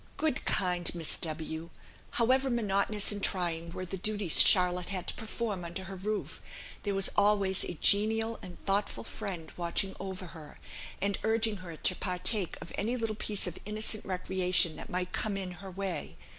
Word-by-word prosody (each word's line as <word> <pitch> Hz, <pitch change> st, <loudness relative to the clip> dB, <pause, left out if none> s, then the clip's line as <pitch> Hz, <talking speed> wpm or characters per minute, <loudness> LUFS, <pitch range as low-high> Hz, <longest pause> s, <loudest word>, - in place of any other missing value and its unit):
Good, 310 Hz, -5 st, -1 dB
kind 180 Hz, -2 st, 0 dB
Miss 165 Hz, -2 st, +2 dB
W! 160 Hz, 0 st, -4 dB, 0.5 s
however 260 Hz, +3 st, +2 dB
monotonous 210 Hz, -3 st, +1 dB
and 205 Hz, -1 st, -5 dB
trying 170 Hz, -4 st, 0 dB
were 185 Hz, +1 st, -6 dB
the 190 Hz, +2 st, -6 dB
duties 205 Hz, -3 st, +5 dB
Charlotte 180 Hz, -2 st, +5 dB
had 185 Hz, -2 st, -3 dB
to -, -, -2 dB
perform 220 Hz, -4 st, -4 dB
under 170 Hz, +3 st, -5 dB
her 190 Hz, +1 st, -8 dB
roof, 205 Hz, +3 st, -4 dB, 0.4 s
there 200 Hz, -2 st, -2 dB
was 195 Hz, 0 st, +6 dB
always 200 Hz, -2 st, +4 dB
a 175 Hz, -, -4 dB
genial 220 Hz, +6 st, +2 dB
and 180 Hz, -1 st, -9 dB
thoughtful 200 Hz, +1 st, -1 dB
friend 175 Hz, -5 st, -6 dB
watching 175 Hz, +3 st, -1 dB
over 190 Hz, -1 st, -6 dB
her, 155 Hz, -3 st, -12 dB, 0.4 s
and 200 Hz, +1 st, -1 dB
urging 220 Hz, -1 st, +1 dB
her 180 Hz, -3 st, -9 dB
to 185 Hz, -, 0 dB
partake 185 Hz, +1 st, +3 dB
of 165 Hz, -, -12 dB
any 230 Hz, +5 st, -1 dB
little 225 Hz, -2 st, -2 dB
piece 210 Hz, -1 st, -3 dB
of 180 Hz, -2 st, -6 dB
innocent 215 Hz, +1 st, 0 dB
recreation 185 Hz, -2 st, +1 dB
that -, -, -9 dB
might 180 Hz, -2 st, -2 dB
come 210 Hz, -2 st, -2 dB
in 190 Hz, -2 st, -4 dB
her 195 Hz, -, -8 dB
way. 180 Hz, -, -5 dB
195 Hz, 170 wpm, -30 LUFS, 180-210 Hz, 0.5 s, was